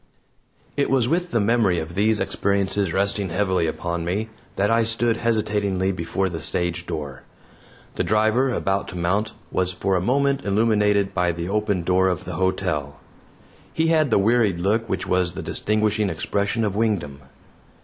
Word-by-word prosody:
It 140 - +1
was 130 -3 +2
with 175 +5 0
the 115 - +1
memory 105 -4 +2
of 80 0 -4
these 105 +3 +2
experiences 100 -1 0
resting 100 +1 0
heavily 95 -1 +1
upon 85 +1 -3
me 100 +6 -2 0.3
that 100 +2 +1
I 115 0 +4
stood 115 +1 +1
hesitatingly 105 -4 0
before 95 +2 -2
the 85 -3 -5
stage 85 +1 -2
door. 75 -5 -5 0.8
The - - +1
driver, 110 +5 +2
about 100 -5 -1
to - - -8
mount, 100 +5 0 0.2
was 90 0 0
for 95 +1 -1
a 90 - +1
moment 140 +6 +1
illuminated 105 -1 +2
by 90 -1 +1
the 85 +1 -5
open 105 -3 0
door 95 +2 +3
of 90 -3 -2
the 90 - -5
hotel. 80 -5 -1 0.7
He 160 0 +1
had 155 -3 +3
the - - +3
wearied 105 -2 +3
look 105 +5 0
which 95 - -2
was 90 -1 +1
the - - -6
distinguishing 105 -1 0
expression 100 +6 -1
of 100 -2 -1
Wingdam. 95 -11 -1
100 Hz, 165 wpm, -23 LUFS, 90-110 Hz, 0.8 s, I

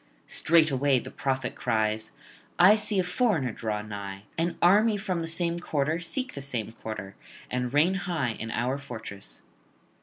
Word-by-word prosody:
Straightway 145 -4 +3
the - - -5
prophet 130 -2 -2
cries: 110 -2 0 0.5
'I 185 +4 +8
see 210 -1 0
a 185 - +3
foreigner 180 - +1
draw 105 -2 -3
nigh, 100 -2 -7
an 170 +1 -1
army 210 +5 +5
from 190 -4 -2
the 165 - -3
same 170 +1 0
quarter 155 -1 0
seek 255 +9 -3
the 140 - -6
same 120 -6 -3
quarter, 110 -4 -7 0.4
and 125 -1 -1
reign 155 +7 +4
high 175 -10 -1
in 110 0 -6
our 125 +5 -1
fortress.' 110 - -8
140 Hz, 155 wpm, -27 LUFS, 110-175 Hz, 0.5 s, I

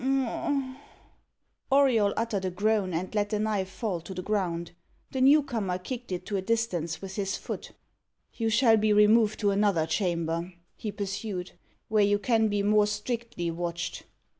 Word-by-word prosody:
Auriol 255 -7 +4
uttered 225 -4 -1
a 185 - 0
groan 200 +1 +1
and 175 +4 -3
let 205 -1 0
the 210 - 0
knife 205 -3 -1
fall 190 -2 -3
to 190 +3 -8
the 185 - -4
ground. 175 -5 -1 0.4
The 260 - -2
new 285 +3 +6
comer 215 -9 -2
kicked 240 +5 -7
it 180 0 -3
to 205 - -2
a - - -1
distance 190 -7 -1
with 190 +1 -7
his 195 -1 -1
foot. - - -7 0.6
"You 225 -1 -1
shall 225 0 +5
be 215 0 +3
removed 210 +1 +4
to 205 -1 +3
another 200 -5 +2
chamber," 170 0 -1 0.2
he 215 - -5
pursued, 195 -2 -4 0.4
"where 215 -1 +3
you 205 0 +3
can 225 +1 +2
be 205 -1 0
more 210 0 +4
strictly 210 -4 -3
watched." 170 0 -4
205 Hz, 165 wpm, -28 LUFS, 185-220 Hz, 0.6 s, new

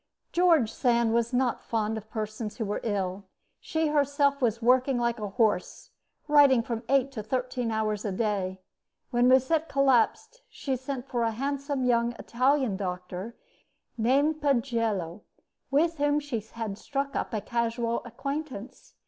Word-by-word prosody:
George 330 -10 +4
Sand 235 -3 +2
was 235 0 +1
not 250 -1 +1
fond 220 -1 -1
of 220 0 -8
persons 215 0 -5
who 225 - -2
were 205 - -2
ill. 195 -3 -2 0.3
She 320 -1 -1
herself 285 -1 +2
was 230 -2 +1
working 255 +2 +3
like 235 -1 0
a 210 -1 -4
horse, 205 -3 0 0.4
writing 285 -5 +6
from 230 -1 -3
eight 275 0 +3
to 235 -5 -5
thirteen 250 +1 -2
hours 215 -2 -1
a 205 - -2
day. 190 -2 -2 0.5
When 245 0 +3
Musset 280 +5 +3
collapsed 275 - +2
she 270 -2 -3
sent 260 0 -5
for 240 -2 -2
a 230 - +2
handsome 275 +3 -2
young 235 -1 +2
Italian 255 -2 +1
doctor 185 +3 -5 0.6
named 280 +7 +2
Pagello, 230 - 0 0.5
with 325 +4 +2
whom 290 +1 +2
she 285 -6 -3
had 220 -1 -6
struck 275 +2 -3
up - - -2
a 220 - -1
casual 235 +1 -1
acquaintance. 265 -1 -6
240 Hz, 150 wpm, -28 LUFS, 220-275 Hz, 0.6 s, writing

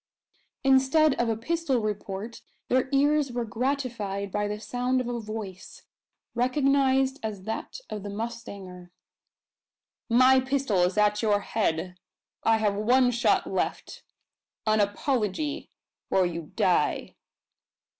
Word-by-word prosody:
Instead 270 +3 +4
of 240 - 0
a 225 - 0
pistol 305 +2 0
report 210 0 -4 0.3
their 255 +1 +2
ears 285 0 +2
were 240 -1 -2
gratified 220 -5 -2
by 205 +1 -1
the 210 0 -4
sound 250 +3 -1
of 250 - -3
a 240 -1 -2
voice, 215 -4 -8 0.5
recognised 270 +1 +2
as 210 -4 -5
that 220 +3 -5
of 210 - -5
the 205 - -6
mustanger. 200 -5 -7 1.2
"My 255 +3 +6
pistol 260 -7 0
is 180 +3 +1
at 210 0 +3
your 205 -2 +2
head! 180 -4 -1 0.5
I 225 0 +4
have 210 -2 +1
one 245 +5 +3
shot 240 +1 +2
left - - -3 0.6
an 215 0 +3
apology, 220 +6 -1 0.4
or 190 -1 +3
you 170 -3 -5
die!" - - +1
230 Hz, 125 wpm, -27 LUFS, 205-260 Hz, 1.2 s, My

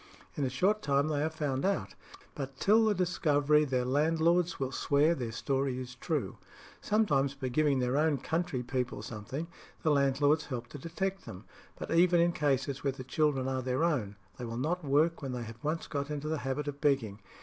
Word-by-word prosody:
In 145 - -2
a 130 - +1
short 195 - +1
time 140 +1 +1
they 145 -2 0
are 155 - +1
found 145 -4 -2
out; 105 - 0 0.4
but 135 -1 -6
till 220 +7 +4
the 215 -1 +2
discovery 150 -4 +2
their 130 -3 0
landlords 165 +5 +2
will 135 -1 -2
swear 145 +4 +2
their 120 -7 -4
story 135 +2 -1
is 125 -1 -7
true. 125 - -3 0.4
Sometimes, 145 -11 +1
by 130 -2 -4
giving 145 +1 +2
their 125 0 0
own 150 0 +2
country 160 -2 -2
people 125 0 -3
something, 120 +8 -5 0.4
the 155 - +3
landlords 145 +2 +2
help 125 -4 -4
to 145 - -9
detect 190 +6 -3
them. 95 -4 -8 0.3
But - - -6
even 175 +1 +5
in 170 +1 +4
cases 140 -3 -1
where 140 -2 0
the 130 -1 -8
children 135 -1 +1
are 130 -1 -1
their 130 +4 -1
own, 125 -12 0 0.2
they 125 - -4
will 115 0 -5
not 165 +7 -1
work 155 +4 +2
when 135 -3 -4
they 125 -1 -4
have 115 +1 -10
once 155 +2 -1
got 140 -1 -3
into 150 0 -4
the 155 -1 -1
habit 135 +3 -3
of 145 0 -5
begging. 115 -8 +1
140 Hz, 200 wpm, -31 LUFS, 130-160 Hz, 0.4 s, even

